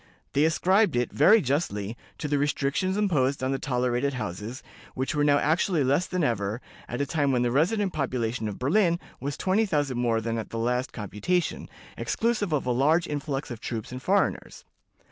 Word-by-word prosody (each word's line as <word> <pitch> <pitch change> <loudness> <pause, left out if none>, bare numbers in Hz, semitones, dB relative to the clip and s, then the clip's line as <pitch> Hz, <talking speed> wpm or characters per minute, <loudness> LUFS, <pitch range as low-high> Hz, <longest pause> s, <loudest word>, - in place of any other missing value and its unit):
They 145 +2 +4
ascribed 185 - +3
it, 120 0 0
very 205 +10 +6
justly, 120 - -1 0.2
to 150 - -4
the 145 -1 +1
restrictions 145 +6 0
imposed 140 -10 +1
on 130 - 0
the 135 - -1
tolerated 125 +1 0
houses, 110 +2 -5 0.3
which 130 +1 -2
were 145 -1 +1
now 145 -1 +4
actually 160 +2 +2
less 140 +8 +2
than 180 -2 -1
ever, 110 -3 -1 0.3
at 120 - -3
a - - +1
time 145 -2 +1
when 125 -2 +2
the 120 - +1
resident 185 - +1
population 125 -5 -2
of 105 - -5
Berlin 170 +5 +2 0.2
was 140 +2 -4
twenty 205 +4 +1
thousand 145 -8 0
more 115 -2 +2
than 115 +1 -2
at 110 - -6
the 115 - -5
last 125 +3 0
computation, 115 - -2 0.3
exclusive 225 -5 0
of 150 -4 0
a 125 - +1
large 155 +7 +3
influx 145 -2 -3
of 115 -2 -7
troops 115 -2 -5
and 130 0 -6
foreigners. 195 +7 0
140 Hz, 185 wpm, -26 LUFS, 120-165 Hz, 0.3 s, very